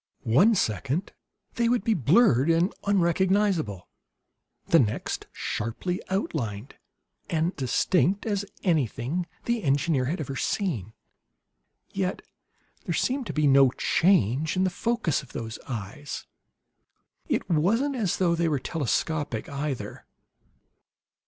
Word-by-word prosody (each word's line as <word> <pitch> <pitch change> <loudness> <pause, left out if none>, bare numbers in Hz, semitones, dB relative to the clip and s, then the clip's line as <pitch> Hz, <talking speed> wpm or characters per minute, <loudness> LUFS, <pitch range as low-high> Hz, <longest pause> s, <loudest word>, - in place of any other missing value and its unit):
One 180 - +4
second 140 - -1 0.5
they 235 0 +2
would 245 -4 +1
be 225 - +2
blurred 165 - +4
and 170 +3 +2
unrecognizable; 185 - +1 0.8
the 165 - +5
next, 110 -4 -1
sharply 120 - -3
outlined 130 - -3 0.6
and 165 +3 0
distinct 175 +9 +1
as 205 -3 -1 0.2
anything 155 - 0 0.2
the 235 -1 0
engineer 140 -1 +1
had 160 +7 -2
ever 140 -3 -4
seen. 130 - -2 1.0
Yet, 190 -1 -2 0.6
there - - -1
seemed 260 -2 0
to - - -4
be 155 -1 +1
no 135 -1 +6
change 155 - +2
in 185 - +3
the 185 - +1
focus 230 - 0
of 135 - -16
those 115 0 -5
eyes. 125 +5 -6 1.0
It - - 0
wasn't 220 - +2
as 210 -8 0
though 175 -2 +2
they 170 0 +1
were 150 - +1
telescopic, 145 -3 -2
either. 140 -2 -5
160 Hz, 120 wpm, -26 LUFS, 135-190 Hz, 1.0 s, no